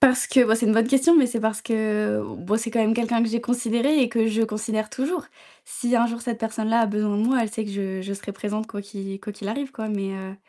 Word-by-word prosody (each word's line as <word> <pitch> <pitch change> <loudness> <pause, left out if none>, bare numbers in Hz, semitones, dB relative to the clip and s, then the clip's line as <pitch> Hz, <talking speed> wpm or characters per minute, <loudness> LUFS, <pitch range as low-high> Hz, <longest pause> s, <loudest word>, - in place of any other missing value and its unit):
Parce 255 -3 +5
que 255 -2 +5
bah, 225 -1 +3
c'est 230 - 0
une 215 - +4
bonne 225 +1 +3
question, 275 +6 +5
mais 285 -5 +6
c'est 240 -1 -2
parce 220 0 -1
que 215 - 0 0.2
bon 205 +5 -1
c'est 230 0 -4
quand 235 - +2
même 220 0 +3
quelqu'un 230 0 +1
que 230 - +2
j'ai 235 +1 -1
considéré 245 +4 +1
et 250 - +3
que 230 -1 +1
je 225 0 +1
considère 215 0 -2
toujours. 295 +4 -2 0.4
Si, 245 -2 -2
un 235 0 +3
jour 235 0 -5
cette 235 -2 -3
personne-là 225 +1 0
a 225 - +3
besoin 210 0 0
de 210 - +1
moi, 255 +3 +3
elle 225 -2 -1
sait 220 0 -3
que 205 - -6
je 195 -1 -4
je 200 +1 -5
serai 200 +1 -6
présente 210 +2 -4
quoi 205 -2 -7
qu'i 195 -1 -7
quoi 210 - -7
qu'il 200 0 -8
arrive 275 +4 -3
quoi, 220 -6 -6
mais 200 -2 -2
heu 190 0 -7
225 Hz, 275 wpm, -24 LUFS, 210-235 Hz, 0.4 s, mais